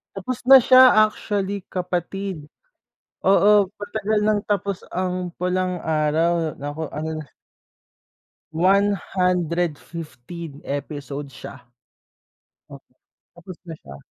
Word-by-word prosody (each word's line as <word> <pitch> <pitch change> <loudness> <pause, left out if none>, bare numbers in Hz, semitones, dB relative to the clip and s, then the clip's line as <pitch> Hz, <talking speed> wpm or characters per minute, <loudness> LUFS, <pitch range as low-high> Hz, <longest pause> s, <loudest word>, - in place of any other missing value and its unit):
Tapos 215 +6 -4
na 270 0 +10
siya, 255 -3 +7
actually, 200 -2 -3
kapatid. 180 -1 -3 0.8
Oo, 200 +1 +5
matagal 215 +1 -1
ng 210 0 +2
tapos 200 -2 -1 0.2
ang 180 0 -2
Pulang 180 0 -1
Araw. 160 +1 +1
Naka-ano 150 +2 -5
na 150 - -9 1.3
one 195 +5 +3 0.2
hundred 175 -3 0
fifteen 165 -1 -9
episodes 145 0 -5
siya. 130 - -11 1.1
O - - -10 0.6
Tapos 175 +1 -11
na 165 - -7
siya. 70 - -12
180 Hz, 100 wpm, -22 LUFS, 160-200 Hz, 1.3 s, na